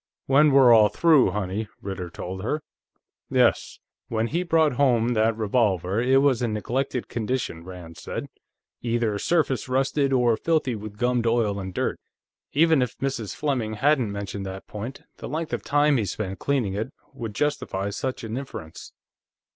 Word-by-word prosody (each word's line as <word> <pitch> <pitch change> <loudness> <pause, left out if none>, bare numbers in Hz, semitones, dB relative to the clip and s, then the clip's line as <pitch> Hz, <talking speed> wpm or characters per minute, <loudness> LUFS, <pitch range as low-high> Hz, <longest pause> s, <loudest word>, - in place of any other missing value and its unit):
"When 145 +2 +5
we're 135 -3 +7
all 110 -2 +6
through, 160 -1 +4
honey," 105 +1 -3
Ritter 95 -3 -5
told 95 +2 -6
her. 145 +9 -2 0.7
"Yes. - - +2 0.3
When 110 0 0
he 165 +9 -1
brought 160 -4 +3
home 120 -3 +3
that 110 -1 +2
revolver, 105 -3 +1
it 135 +2 +4
was 135 -5 +3
in 115 -3 0
neglected 125 +3 -2
condition," 115 -7 -3
Rand 90 -2 -10
said. - - -5 0.6
"Either 115 -3 0
surface 150 -5 0
rusted, 135 +2 +1
or 120 -3 +3
filthy 155 -6 +1
with 105 -1 -7
gummed 120 0 +1
oil 115 -4 +1
and 95 -1 -5
dirt. - - -2 0.5
Even 160 -1 +4
if 125 -2 -2
Mrs. 130 -6 -3
Fleming 125 -7 -1
hadn't 130 -2 +2
mentioned 100 -1 -5
that 95 0 -7
point, 110 +5 -7
the - - -7
length 160 +2 -3
of - - -1
time 145 0 +3
he 110 - 0
spent 95 0 -4
cleaning 130 -9 0
it 110 +6 -3 0.2
would 115 -6 -6
justify 100 -8 -1
such 130 +5 -4
an 115 +1 -4
inference. 80 - -8
120 Hz, 165 wpm, -25 LUFS, 105-135 Hz, 0.7 s, we're